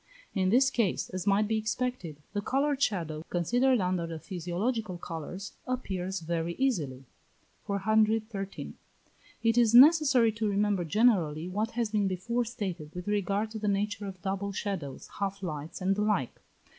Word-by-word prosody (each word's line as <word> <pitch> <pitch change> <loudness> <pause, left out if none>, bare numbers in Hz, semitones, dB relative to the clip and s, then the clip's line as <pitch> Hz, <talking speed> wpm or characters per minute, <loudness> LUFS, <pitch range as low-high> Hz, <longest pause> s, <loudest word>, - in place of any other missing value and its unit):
In 185 -2 +1
this 260 +5 +4
case, 230 -7 0
as 185 +1 -4
might 205 +1 +3
be 220 0 +1
expected, 220 - -3 0.2
the 205 - -1
coloured 275 +4 0
shadow, 165 - -1
considered 245 +9 +2
under 180 -2 0
the 165 -1 -5
physiological 185 +4 -3
colours, 175 +3 -6
appears 190 -7 -3
very 170 +1 -2
easily. 150 - -1 0.6
413. 215 0 0 0.7
It 230 +1 +4
is 235 -1 +4
necessary 275 -4 +7
to 220 -1 -1
remember, 200 -2 +1
generally, 170 -5 +2
what 210 +4 -1
has 230 -3 0
been 205 -2 +2
before 235 +6 -1
stated 190 -10 -5
with 180 +1 -6
regard 205 +1 0
to 220 - -5
the 210 - -2
nature 205 0 -1
of 190 -1 -8
double 195 +1 -2
shadows, 185 -9 -4
half 200 0 -2
lights, 155 -1 -5
and 190 +1 +2
the 205 - -1
like. 210 - 0
200 Hz, 155 wpm, -29 LUFS, 180-225 Hz, 0.7 s, necessary